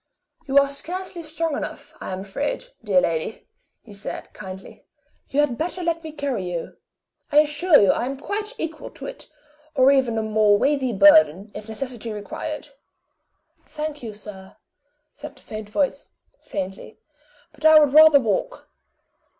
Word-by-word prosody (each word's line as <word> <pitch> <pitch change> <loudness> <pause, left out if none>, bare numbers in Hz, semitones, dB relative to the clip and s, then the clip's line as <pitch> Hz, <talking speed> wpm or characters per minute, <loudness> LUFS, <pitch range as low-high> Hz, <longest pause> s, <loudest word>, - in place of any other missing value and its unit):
"You 270 +1 +1
are 280 0 +6
scarcely 350 +5 -6
strong 325 -1 -3
enough, - - -6
I - - -5
am 185 0 -4
afraid, 290 - -4
dear 195 -4 +3
lady," 165 +6 -3 0.4
he 215 - -14
said, 200 0 -7
kindly. 190 -2 -10 0.5
"You 285 - +2
had 265 -5 -1
better 350 +2 -3
let 335 -1 -1
me 315 - -7
carry 270 -11 -3
you. 170 -2 -5 0.5
I 295 - +2
assure 300 +2 +4
you 200 - +5
I 240 - -1
am 275 +1 -4
quite 420 - -4
equal 320 -1 -5
to - - -10
it, - - -8 0.5
or 265 0 +6
even 260 -5 +2
a 220 - 0
more 215 -1 +3
weighty 275 0 +1
burden, 220 - +5
if 210 +1 -9
necessity 235 0 -5
required." 210 -1 -6 1.0
"Thank 300 -1 -5
you, 220 -4 -7
sir," 195 -2 -11 0.6
said 300 +1 -10
the - - -20
faint 215 -1 -8
voice, 280 +6 -2 0.3
faintly; 195 +2 -6 0.6
"but 300 0 -18
I 315 0 +8
would 295 -3 +5
rather 310 -1 +8
walk. 265 - -2
270 Hz, 160 wpm, -23 LUFS, 210-310 Hz, 1.0 s, I